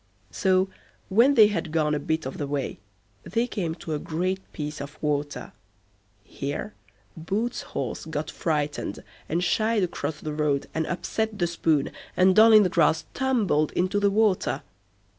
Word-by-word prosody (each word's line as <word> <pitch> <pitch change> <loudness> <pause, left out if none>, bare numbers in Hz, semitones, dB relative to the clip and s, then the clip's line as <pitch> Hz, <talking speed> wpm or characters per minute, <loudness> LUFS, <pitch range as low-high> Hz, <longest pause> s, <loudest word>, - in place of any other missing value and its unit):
So, 185 -1 +2 0.4
when 235 +8 +5
they 220 - +9
had 205 -6 -1
gone 155 -2 +1
a 150 - 0
bit 160 +1 -2
of 130 - -6
the 145 - -2
way, 140 -1 -3 0.4
they 230 +8 -1
came 175 -9 -3
to 165 -2 -6
a 150 - -1
great 185 +5 -2
piece 150 -1 -5
of 145 +1 -8
water. 145 -1 -2 0.7
Here 140 -5 -5 0.4
Boots' 210 +9 -2 0.2
horse 130 -5 -3
got 155 -1 -4
frightened, 150 -3 -2 0.3
and 170 +3 0
shied 215 +3 +2
across 160 -3 -3
the 155 - -5
road 150 -2 0
and 160 0 -1
upset 220 +4 -2
the 175 - +1
spoon, 160 -4 +1 0.3
and 185 0 +5
Doll 220 +1 +8
i' - - +11
the 210 -3 +6
Grass 160 -2 +2
tumbled 215 - +1
into 185 +3 +1
the 205 0 +3
water. 205 -2 +1
170 Hz, 160 wpm, -26 LUFS, 150-205 Hz, 0.7 s, i